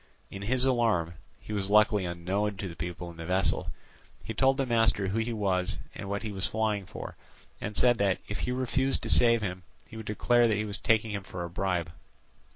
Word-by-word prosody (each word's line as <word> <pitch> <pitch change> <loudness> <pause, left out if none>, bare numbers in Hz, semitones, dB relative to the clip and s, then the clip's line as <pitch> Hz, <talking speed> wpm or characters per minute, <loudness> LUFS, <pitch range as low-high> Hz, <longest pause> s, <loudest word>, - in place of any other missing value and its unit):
In 100 - -7
his 125 +5 +3
alarm—he 105 -7 -1
was 100 -2 -1
luckily 105 -2 +4
unknown 95 +4 -2
to 95 - -4
the 85 - -8
people 85 +1 -6
in 85 - -15
the 80 - -7
vessel—he 95 +4 -2
told 135 +3 +3
the 135 - +1
master 115 -4 +2
who 105 +4 -1
he 115 +1 -1
was 95 -5 0 0.2
and 100 - -7
what 100 +1 -2
he 110 - -4
was 95 -2 -2
flying 105 -3 -1
for, - - -8 0.5
and 105 - -4
said 120 -2 +4
that, 100 -2 +2
if 105 - -4
he 125 - -2
refused 130 +1 0
to - - 0
save 115 -2 +6
him, 90 -2 -4 0.2
he 110 - -11
would 110 -1 -8
declare 120 +3 +3
that 110 -3 +1
he 105 - -1
was 105 0 -4
taking 110 -1 +2
him 100 -1 -3
for 90 -2 -7
a 85 - -6
bribe. 90 -3 -1
105 Hz, 210 wpm, -29 LUFS, 95-115 Hz, 0.5 s, save